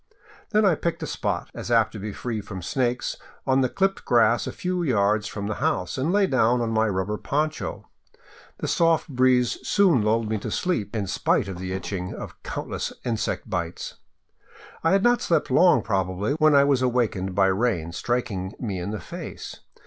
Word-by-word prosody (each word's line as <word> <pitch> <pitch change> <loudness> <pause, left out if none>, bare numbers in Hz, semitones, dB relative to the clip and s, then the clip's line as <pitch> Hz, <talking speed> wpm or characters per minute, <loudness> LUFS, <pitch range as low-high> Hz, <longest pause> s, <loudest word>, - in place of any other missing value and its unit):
Then 215 -1 +3
I 190 - +5
picked 170 +2 -2
a - - -1
spot, - - -3
as - - -6
apt 115 -2 +3
to 110 - -8
be 105 +2 -4
free 110 +1 -4
from 95 -3 -8
snakes, 125 +3 -1 0.3
on 135 0 +3
the 130 - +2
clipped 195 0 0
grass 120 -1 +3
a - - -2
few 180 0 -2
yards 105 -7 +2
from 100 -1 -5
the 110 - -1
house, 90 -1 0
and 135 +6 0
lay 200 +1 +4
down 125 -6 +2
on 115 -1 -1
my 110 0 +2
rubber 100 +1 -2
poncho. 155 +2 -2 0.7
The - - -4
soft 165 -1 +2
breeze 125 -2 +2
soon 185 - +3
lulled 110 +1 +1
me 110 0 -1
to - - -5
sleep, 115 - -1
in 105 -2 -1
spite 95 - +1
of 95 -2 -6
the 95 0 -4
itching 95 -1 -4
of - - -9
countless - - -4
insect 115 -1 -2
bites. 90 -4 -4 0.9
I 165 - +3
had 195 0 +3
not 240 0 +4
slept 170 - +1
long 180 -1 +5
probably, 95 +3 -1
when 155 -1 +4
I 140 - +7
was 140 -2 +2
awakened 115 -7 0
by 100 0 +4
rain 95 -4 0
striking 100 -3 -2
me 100 -7 -3
in 90 +3 -4
the 105 0 -4
face. - - -8
115 Hz, 190 wpm, -25 LUFS, 100-140 Hz, 0.9 s, I